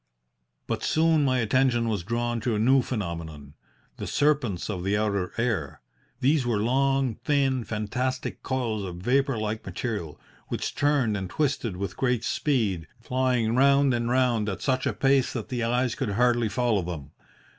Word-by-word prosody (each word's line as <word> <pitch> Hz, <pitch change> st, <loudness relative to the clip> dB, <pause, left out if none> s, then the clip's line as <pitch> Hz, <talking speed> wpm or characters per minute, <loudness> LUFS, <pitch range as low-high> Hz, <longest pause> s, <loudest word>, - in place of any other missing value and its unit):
"But -, -, -3 dB
soon 160 Hz, -1 st, +3 dB
my 130 Hz, -2 st, +2 dB
attention 120 Hz, +1 st, +2 dB
was 105 Hz, -5 st, -1 dB
drawn 120 Hz, +4 st, -2 dB
to 120 Hz, -2 st, 0 dB
a -, -, -1 dB
new 130 Hz, +4 st, +4 dB
phenomenon 85 Hz, -, -5 dB, 0.4 s
the -, -, -5 dB
serpents 140 Hz, -, +1 dB
of 95 Hz, -5 st, -4 dB
the 100 Hz, +2 st, +1 dB
outer 100 Hz, -4 st, -1 dB
air. 110 Hz, -, -1 dB, 0.4 s
These 140 Hz, +2 st, +3 dB
were 120 Hz, -3 st, 0 dB
long, 130 Hz, +1 st, +1 dB
thin, 135 Hz, -3 st, +1 dB
fantastic 125 Hz, +5 st, -3 dB
coils 120 Hz, -5 st, -2 dB
of 90 Hz, -2 st, -5 dB
vapour 130 Hz, -, +1 dB
like 110 Hz, 0 st, -3 dB
material, 100 Hz, -, -4 dB, 0.3 s
which -, -, -3 dB
turned 140 Hz, -7 st, +2 dB
and 95 Hz, -3 st, -4 dB
twisted 130 Hz, -9 st, -1 dB
with 95 Hz, -1 st, -4 dB
great 125 Hz, -3 st, +1 dB
speed, 105 Hz, -, 0 dB
flying 125 Hz, -1 st, 0 dB
round 140 Hz, +1 st, +4 dB
and 120 Hz, 0 st, -1 dB
round 120 Hz, -4 st, +2 dB
at 95 Hz, -, -5 dB
such 130 Hz, -2 st, +1 dB
a -, -, 0 dB
pace 135 Hz, -1 st, +2 dB
that 115 Hz, -4 st, -5 dB
the 120 Hz, -2 st, -2 dB
eyes 120 Hz, +1 st, +1 dB
could 125 Hz, -8 st, -2 dB
hardly 120 Hz, 0 st, +2 dB
follow 115 Hz, -2 st, +1 dB
them. 80 Hz, -5 st, -6 dB
120 Hz, 165 wpm, -26 LUFS, 105-130 Hz, 0.4 s, new